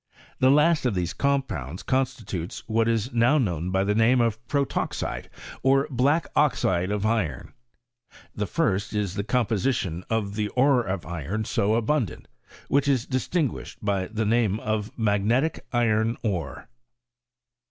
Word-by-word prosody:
The 130 Hz, -, +5 dB
last 150 Hz, 0 st, +4 dB
of 115 Hz, -, -1 dB
these 90 Hz, -1 st, -1 dB
compounds 115 Hz, -, -2 dB
constitutes 120 Hz, -10 st, -2 dB
what 115 Hz, +1 st, +1 dB
is 115 Hz, +2 st, 0 dB
now 120 Hz, +5 st, +4 dB
known 90 Hz, -, -1 dB
by 95 Hz, +1 st, +1 dB
the 105 Hz, +1 st, +1 dB
name 115 Hz, +4 st, +4 dB
of 115 Hz, -1 st, 0 dB
protoxide, 140 Hz, -2 st, -2 dB, 0.3 s
or 135 Hz, +2 st, +3 dB
black 140 Hz, +6 st, +2 dB
oxide 95 Hz, -11 st, +2 dB
of 105 Hz, 0 st, -1 dB
iron. 105 Hz, -, -1 dB, 0.8 s
ITie 105 Hz, -1 st, -2 dB
first 110 Hz, -, 0 dB
is 100 Hz, -4 st, -1 dB
the 100 Hz, 0 st, -2 dB
composition 110 Hz, -6 st, 0 dB
of 110 Hz, -3 st, -1 dB
the 105 Hz, 0 st, -1 dB
ore 130 Hz, -1 st, +4 dB
of 95 Hz, -5 st, -4 dB
iron 90 Hz, +6 st, -3 dB
so 105 Hz, 0 st, +1 dB
abundant, 115 Hz, -, -1 dB, 0.4 s
which 140 Hz, 0 st, +2 dB
is 130 Hz, -4 st, +2 dB
distinguished 135 Hz, +3 st, -2 dB
by 100 Hz, -2 st, 0 dB
the 110 Hz, +1 st, -2 dB
name 110 Hz, -2 st, +2 dB
of 110 Hz, -1 st, -2 dB
magnelic 110 Hz, +7 st, +1 dB
iron 115 Hz, -1 st, +1 dB
otp.. 95 Hz, -7 st, -3 dB
110 Hz, 140 wpm, -25 LUFS, 100-130 Hz, 0.8 s, The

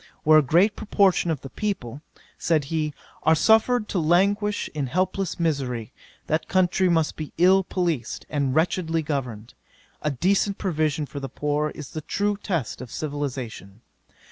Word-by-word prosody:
Where 155 Hz, 0 st, +7 dB
a -, -, +4 dB
great 175 Hz, -, +3 dB
proportion 195 Hz, -4 st, +2 dB
of 155 Hz, -5 st, -1 dB
the 135 Hz, -, -9 dB
people 150 Hz, -, -4 dB, 0.3 s
(said 160 Hz, -3 st, +1 dB
he,) 155 Hz, +1 st, -2 dB, 0.3 s
are 160 Hz, +1 st, +4 dB
suffered 220 Hz, +5 st, +3 dB
to 190 Hz, -, 0 dB
languish 200 Hz, +6 st, +2 dB
in 145 Hz, -3 st, -2 dB
helpless 185 Hz, +5 st, -1 dB
misery, 135 Hz, -9 st, -1 dB, 0.3 s
that 155 Hz, +1 st, -1 dB
country 185 Hz, 0 st, +2 dB
must 165 Hz, -3 st, +1 dB
be 155 Hz, -2 st, -7 dB
ill 190 Hz, +2 st, +5 dB
policed, 170 Hz, -11 st, -2 dB
and 140 Hz, -3 st, -1 dB
wretchedly 165 Hz, 0 st, +1 dB
governed: 125 Hz, -7 st, -4 dB, 0.5 s
a 150 Hz, -, 0 dB
decent 195 Hz, +8 st, +1 dB
provision 155 Hz, -5 st, 0 dB
for 140 Hz, -, -7 dB
the 135 Hz, -1 st, -5 dB
poor, 150 Hz, +3 st, -1 dB
is 150 Hz, -3 st, -8 dB
the 155 Hz, -, -5 dB
true 205 Hz, +6 st, -1 dB
test 175 Hz, -, -3 dB
of 125 Hz, -, -8 dB
civilization. 130 Hz, -9 st, -5 dB
155 Hz, 155 wpm, -24 LUFS, 140-185 Hz, 0.5 s, Where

